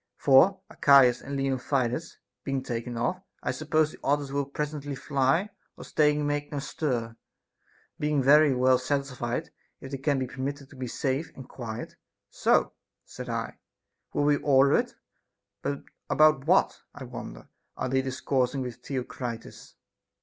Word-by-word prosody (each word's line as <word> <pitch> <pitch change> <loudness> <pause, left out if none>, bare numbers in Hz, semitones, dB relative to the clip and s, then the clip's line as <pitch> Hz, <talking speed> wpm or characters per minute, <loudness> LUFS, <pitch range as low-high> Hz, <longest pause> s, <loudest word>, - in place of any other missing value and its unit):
For, 185 +8 +5
Archias 135 -4 +5
and 140 +1 -6
Leontidas 135 +2 -1 0.3
being 135 -2 -2
taken 120 0 -4
off, 150 +11 -1 0.2
I - - 0
suppose 155 0 +1
the - - -14
others 145 0 0
will 140 0 -1
presently 145 0 -4
fly, 140 +9 +1 0.3
or - - -9
staying 150 -1 +2
make 145 0 -2
no 145 - -3
stir, 125 -5 -2 0.8
being 150 -2 +1
very 150 +2 +6
well 130 0 +4
satisfied 135 0 -2 0.3
if 135 - -9
they 135 - -4
can 140 0 +1
be 130 - -1
per 130 +1 -8
mitted 140 +1 -4
to - - -13
be 130 -1 -5
safe 135 +5 -2
and 130 - -10
quiet. 115 -2 -7 0.3
So, - - +2 0.3
said - - -8
I, - - -4 0.5
we - - 0
will 145 0 +2
order 140 -1 +5
it; - - +1 0.7
but 140 - -3 0.3
about 155 -2 +4
what, 185 +3 +3
I 145 - -8
wonder, 120 -1 -9 0.3
are - - -2
they 130 +1 +1
discoursing 130 0 -1
with 125 -2 -5
Theo 130 +1 -4
critus? 120 -2 -7
135 Hz, 155 wpm, -27 LUFS, 130-145 Hz, 0.8 s, very